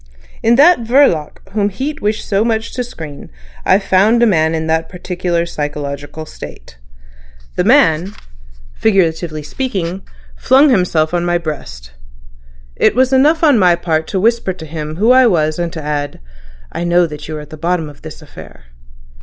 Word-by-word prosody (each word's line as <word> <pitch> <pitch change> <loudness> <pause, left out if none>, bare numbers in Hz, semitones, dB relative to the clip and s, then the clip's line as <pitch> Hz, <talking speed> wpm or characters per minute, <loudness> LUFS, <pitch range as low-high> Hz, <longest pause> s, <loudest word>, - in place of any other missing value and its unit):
In 230 +1 +3
that 305 +6 +6
Verloc 230 - +1
whom 205 0 0
Heat 270 +10 -5
wished 210 +1 -2
so 200 +1 +1
much 225 -1 -2
to 250 - -2
screen 160 - -10 0.3
I've 195 +2 +3
found 205 +5 +3
a - - +6
man 160 -6 +2
in 160 0 -2
that 160 0 -1
particular 180 -1 -2
psychological 145 -1 -5
state. - - -12 0.8
The - - +1
man, 165 +5 +3 0.6
figuratively 165 -6 0
speaking, 190 - -4 0.3
flung 270 +3 +4
himself 175 -6 +1
on 175 -1 0
my 175 0 +1
breast. 65 - -7 0.8
It - - +2
was 260 +1 +2
enough 300 +5 +3
on 290 -7 +5
my 180 -3 +4
part 160 -2 -2
to 190 - -2
whisper 230 -2 +1
to 175 -3 -10
him 155 0 -6
who 215 +8 +3
I 255 -1 +6
was 155 -5 +1
and 170 -1 -2
to 160 - -6
add 145 -1 -3 0.5
'I - - -4
know 175 0 +3
that 150 -2 -8
you 155 0 -5
are - - -6
at 150 - -13
the - - -7
bottom 165 +1 -1
of 145 - -14
this - - -10
affair. - - -13
175 Hz, 170 wpm, -16 LUFS, 155-220 Hz, 0.8 s, that